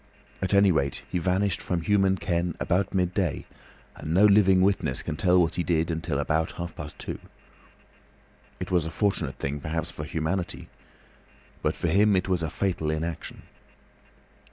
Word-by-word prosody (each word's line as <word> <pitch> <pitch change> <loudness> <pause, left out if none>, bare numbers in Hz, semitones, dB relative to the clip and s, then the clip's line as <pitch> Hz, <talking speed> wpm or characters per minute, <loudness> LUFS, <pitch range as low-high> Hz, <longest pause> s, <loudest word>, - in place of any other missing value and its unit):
At 95 +1 +1
any 100 -1 +6
rate 70 -4 -1
he 90 - 0
vanished 95 +3 0
from 90 -2 -2
human 95 0 +2
ken 85 -1 -1
about 95 +1 0
midday, 90 -3 0 0.5
and 80 +2 -3
no 100 +3 +6
living 100 -2 +5
witness 100 +1 +1
can - - -3
tell 90 +3 +3
what 85 -2 +2
he 90 - -1
did 80 0 +1
until 80 -2 -2
about 80 +3 0
half 85 0 -6
past 75 0 -8
two. - - -6 1.4
It - - -5
was 85 -3 +2
a - - -3
fortunate 85 - 0
thing, 70 +2 -3
perhaps, 80 +3 -2
for 75 +1 -6
humanity, 85 +4 -3 0.9
but - - 0
for - - -1
him 105 +1 +4
it 90 0 0
was 90 -2 +1
a 80 - -1
fatal 90 -5 -1
inaction. 80 +1 -4
85 Hz, 165 wpm, -26 LUFS, 80-95 Hz, 1.4 s, any